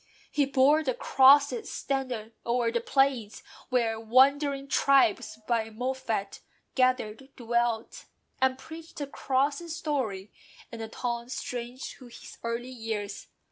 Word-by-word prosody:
He 290 - +2
bore 280 +3 +4
the 260 -4 -1
Cross's 285 - +5
standard 250 -5 -3
o'er 235 -1 +1
the 235 0 0
plains 265 -5 +1 0.3
Where 230 -3 +1
wandering 275 +4 +3
tribes 260 -6 +3
by 225 -2 0
MOFFAT 230 -3 -3 0.3
gathered 255 -1 0
dwelt; 235 -2 -1 0.4
And 260 0 +3
preached 320 +4 -11
the 290 - -2
Cross's 280 +4 -1
story 250 - -3 0.4
in 230 - -8
the 225 - -4
tongues 235 +2 -4
Strange 245 +1 -5
to 255 - -13
his 235 - -12
earlier 230 +1 -2
years. 220 -4 -5
255 Hz, 125 wpm, -28 LUFS, 230-275 Hz, 0.4 s, Cross's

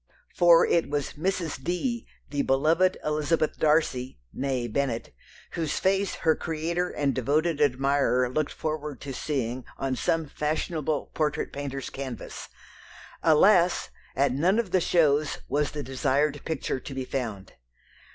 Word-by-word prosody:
For 170 -1 +6
it 170 -4 +1
was 145 -1 -2
"Mrs. 165 -4 -2
D." 230 - -2 0.2
the 145 -1 0
beloved 160 +8 +3
Elizabeth 155 +1 0
Darcy 150 - +1 0.2
(née 130 -4 -2
Bennet), 130 -4 -1 0.4
whose 165 -3 -2
face 195 0 +1
her 160 -1 +2
creator 170 +2 -2
and 140 -2 0
devoted 150 +6 +1
admirer 135 -2 +2
looked 145 +4 -1
forward 150 -3 -4
to 140 -2 -6
seeing 130 -3 -2
on 135 -1 -1
some 165 +4 0
fashionable 155 +1 -2
portrait 150 -1 -1
painter's 140 -1 -5
canvas. 130 -4 -7 0.7
Alas! 175 +3 +4 0.2
at 140 +1 +2
none 170 - +2
of 230 -6 -1
the 185 - +3
shows 150 -4 +2
was 145 +2 +1
the 150 -1 -5
desired 140 +3 0
picture 155 -4 -2
to 135 +1 -8
be 130 -1 -3
found. 110 -8 -4
150 Hz, 135 wpm, -27 LUFS, 135-165 Hz, 0.7 s, For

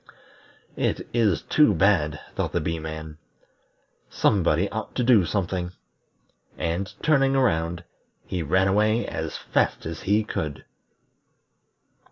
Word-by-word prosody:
"It - - -1
is 110 -8 +2
too 150 -10 +4
bad!" 80 -5 +2
thought - - -2
the - - +1
Bee 80 +1 -2
man. 80 0 -7 0.9
"Somebody 90 -1 +2
ought 110 - -5
to 125 - +1
do 115 -7 +5
something." 90 -1 -2 0.8
And 90 +4 -2
turning 135 -3 +3
around, 85 -9 +1 0.4
he 90 - -3
ran 95 +5 +2
away 105 +4 +2
as - - -4
fast - - 0
as 80 0 -5
he 105 +3 +2
could. 75 -8 -4
95 Hz, 120 wpm, -25 LUFS, 80-110 Hz, 0.9 s, do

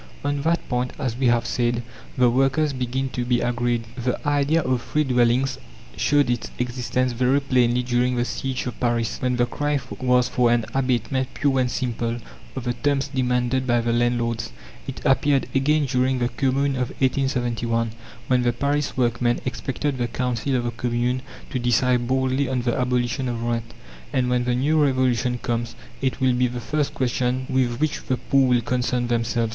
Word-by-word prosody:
On 145 0 0
that 165 +3 0
point, 125 0 -1
as 130 -6 -2
we 130 0 +1
have 120 -1 +3
said, 120 -1 0 0.3
the 125 -1 +5
workers 135 +4 +2
begin 130 +1 -2
to 125 -1 -3
be 120 0 +1
agreed. 120 -1 0
The 125 0 -1
idea 145 +3 +2
of 130 -2 0
free 150 +5 0
dwellings 125 0 +2 0.4
showed 145 -1 +3
its 120 -1 -1
existence 125 +1 -1
very 130 +3 +2
plainly 125 -3 +2
during 125 +1 +1
the 120 0 +1
siege 130 +2 -3
of 125 - -5
Paris, 120 -2 0
when 125 -1 +1
the 120 0 +2
cry 145 +3 -1 0.2
was 125 -1 +3
for 125 -1 +2
an 120 -2 +2
abatement 130 0 0
pure 135 -2 +1
and 125 -1 +1
simple 120 -2 -2 0.4
of - - -4
the 120 0 -1
terms 140 +3 0
demanded 130 -1 0
by 120 -1 +3
the 115 0 0
landlords. 120 -1 0 0.4
It 135 - -7
appeared 140 0 +3
again 145 +3 +2
during 130 0 +1
the 120 -1 0
Commune 140 +1 +1
of 125 -1 -1
1871, 120 -4 0 0.3
when 125 -1 +2
the 120 -1 +1
Paris 140 +3 -1
workmen 120 -1 +1
expected 135 +2 -2
the 120 - 0
Council 125 +2 -1
of 125 - 0
the 120 - -2
Commune 120 +2 -1 0.3
to 130 - -1
decide 120 0 +2
boldly 130 +1 +1
on 125 -2 -1
the 120 -1 0
abolition 125 0 0
of 115 -1 -3
rent. 115 -1 -2 0.4
And 125 -1 +1
when 125 -1 +1
the 125 0 +1
New 150 +4 +2
Revolution 125 -3 +1
comes, 120 -1 -3 0.3
it 130 0 -1
will 130 -1 +3
be 125 0 +2
the 125 0 -5
first 145 +4 -2
question 125 0 0
with 130 -2 0
which 155 0 0
the 130 - +1
poor 135 +1 +2
will 125 -1 +3
concern 125 +1 0
themselves. 115 -1 0
125 Hz, 185 wpm, -23 LUFS, 120-130 Hz, 0.4 s, the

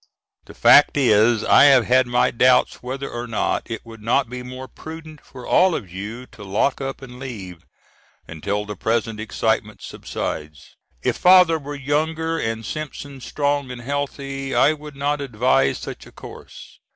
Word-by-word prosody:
The - - -14
fact 130 +5 +6
is 115 -3 +3
I - - +6
have 135 -4 +6
had 130 0 +3
my 120 0 +2
doubts 125 +1 +3
whether 135 +2 -5
or 120 +1 -6
not 115 +1 -2
it 115 0 -6
would 115 -1 -12
not 120 +3 0
be 125 0 -5
more 130 +1 -8
prudent 155 +3 -11
for 125 -2 -12
all 185 -2 +3
of 95 -7 -6
you 105 +6 -7
to 105 - -14
lock 100 +9 0
up 135 0 -5
and 125 -1 -11
leave, 100 -10 -8 0.6
until 100 +6 -3
the 105 0 -6
present 115 0 -1
excitement 110 0 -2
subsides. 75 -1 -6 0.3
If - - 0
father 180 -3 +6
were 145 0 -7
younger 160 +3 -1
and 115 0 -3
Simpson 145 -2 -7
strong 145 0 -1
and 125 -1 -7
healthy, 135 0 -4
I 155 - +4
would 150 -1 -11
not 145 +1 -1
advise 120 - +1
such - - -8
a - - -15
course. - - -13
130 Hz, 165 wpm, -21 LUFS, 115-145 Hz, 0.6 s, fact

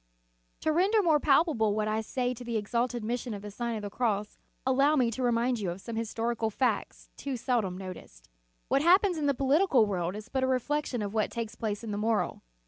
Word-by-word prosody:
To 315 - +1
render 395 +6 +3
more 315 -4 +4
palpable 270 - +3
what 215 0 0
I 215 +1 0
say 245 +3 -1
of 250 - -6
the 235 -2 -3
exalted 235 +3 -1
mission 235 0 -3
of 200 - -8
the 205 - -7
Sign 235 +2 -3
of 215 - -5
the 205 - -5
Cross, 210 -3 -1 0.3
allow 275 +3 +4
me 250 -5 +2
to 260 - -4
remind 240 0 +1
you 195 -4 -2
of 175 +2 -5
some 230 +3 -7
historical 230 0 -1
facts, 250 +4 -2
too 275 -3 -4
seldom 225 -7 0
noticed. 180 - -10 0.4
What 270 +3 +2
happens 360 +1 +4
in 290 - 0
the 280 - +2
political 275 - +4
world 180 -2 -2
is 215 +2 -8
but 265 0 -1
a - - +2
reflection 260 -2 -1
of 200 0 -4
what 215 -1 +1
takes 230 -2 -4
place 215 -1 -3
in 225 - -4
the 205 - -2
moral. 220 0 0
235 Hz, 220 wpm, -29 LUFS, 215-265 Hz, 0.4 s, more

